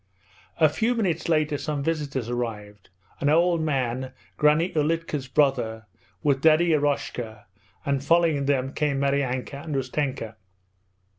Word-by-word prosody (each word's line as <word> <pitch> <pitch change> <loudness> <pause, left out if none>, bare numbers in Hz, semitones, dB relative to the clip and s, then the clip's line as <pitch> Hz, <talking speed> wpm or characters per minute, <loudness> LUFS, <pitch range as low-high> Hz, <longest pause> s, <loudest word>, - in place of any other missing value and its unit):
A 155 - +7
few 225 +11 0
minutes 190 -8 -1
later 155 -3 +1
some 150 -3 -3
visitors 140 -6 -2
arrived: 105 -5 -5 0.3
an 145 - +1
old 170 +2 +3
man, 130 -4 -1 0.2
Granny 150 +4 +3
Ulitka's 155 -2 -1
brother, 125 -6 +1 0.4
with 135 -2 +2
Daddy 160 +2 +5
Eroshka, 140 -6 -2 0.4
and 140 -1 0
following 165 -2 +3
them 135 -1 0
came 145 -2 0
Maryanka 140 0 -1
and 155 -3 -4
Ustenka. 130 -4 -2
140 Hz, 125 wpm, -25 LUFS, 130-155 Hz, 0.4 s, A